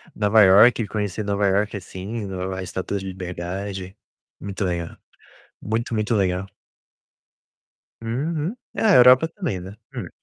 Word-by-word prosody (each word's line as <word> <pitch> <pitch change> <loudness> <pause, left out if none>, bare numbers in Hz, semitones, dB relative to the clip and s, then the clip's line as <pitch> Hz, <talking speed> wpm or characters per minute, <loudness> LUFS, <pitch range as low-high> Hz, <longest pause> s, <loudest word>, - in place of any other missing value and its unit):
Nova 105 +1 +3
Iorque, 105 +4 +6
conhecer 105 0 -3
Nova 100 0 0
Iorque, 105 +2 +1
assim, 100 +4 -6
Nova 95 0 -4
a - - -4
Estátua 95 +2 -4
de 95 - -8
Liberdade. 95 +1 -6 0.4
Muito 100 0 -4
legal. 85 -2 -3 0.6
Muito, 115 +2 -2
muito 110 +2 0
legal. 95 -1 0 1.6
Uhum. 150 - -2 0.2
É, - - -3
a 210 -3 +5
Europa 125 +5 +7
também, 165 - -4
né? 95 +2 -9 0.2
Hum. - - -5
100 Hz, 135 wpm, -23 LUFS, 95-115 Hz, 1.6 s, Europa